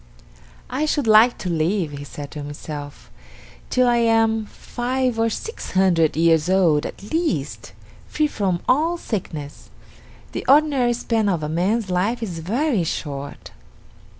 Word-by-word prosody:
"I 295 +4 0
should 290 -3 0
like 220 +2 +6
to 190 - -6
live," 165 +1 0
he 145 -1 -7
said 145 0 -8
to 150 - -6
himself, 145 - -8 0.6
"till 255 0 +3
I 240 0 +3
am 225 -1 +2
five 250 0 -2
or 225 0 +2
six 450 - -6
hundred 175 -5 +3
years 165 0 +3
old 170 -6 +3
at 205 - -11
least, 185 - -2 0.3
free 305 - 0
from 195 -11 -1
all 320 +6 +2
sickness. 155 - -6 0.6
The - - -4
ordinary 275 -4 +4
span 225 -3 0
of 170 -5 -1
a 150 - -2
man's 190 +5 0
life 215 +7 0
is 175 -6 -5
very 225 - 0
short." 145 -3 -5
200 Hz, 145 wpm, -22 LUFS, 160-240 Hz, 0.6 s, like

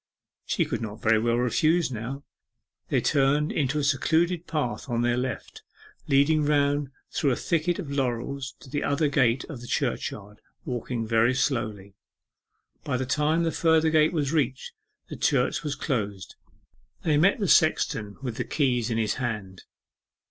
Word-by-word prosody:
She - - +1
could - - -3
not 110 -1 -6
very 110 0 +3
well 115 +1 +1
refuse 155 +7 +2
now. 125 +5 -5 0.7
They - - +2
turned 145 +2 +2
into 145 0 0
a 150 - 0
secluded 160 +5 +1
path 145 -4 -3
on 120 0 0
their 120 0 +2
left, 125 -2 -4 0.5
leading 150 +2 +3
round 145 -1 +1 0.2
through 145 - +1
a 125 - +2
thicket 170 +4 0
of 160 -8 -6
laurels 135 0 -2
to 135 - -13
the 145 0 -1
other 145 +2 +1
gate 130 -3 +2
of 135 -7 -9
the 120 - -9
church - - -1
yard, 105 +1 -12 0.2
walking 120 -1 -3
very 115 +3 +3
slowly. 110 -8 -2 0.9
By 135 -3 -1
the 130 - -2
time 150 +5 +1
the 165 - +1
further 160 -1 +3
gate 155 0 +4
was 150 -3 -1
reached, 135 -5 -1 0.4
the - - -7
church - - +1
was 145 -2 -3
closed. 105 - -3 0.7
They 155 -3 +2
met 180 +7 +4
the 200 - -1
sexton 110 -11 +2
with 125 -4 -4
the - - -1
keys 125 -6 0
in 115 - -1
his 110 -2 +1
hand. 105 -6 -4
135 Hz, 165 wpm, -26 LUFS, 120-150 Hz, 0.9 s, gate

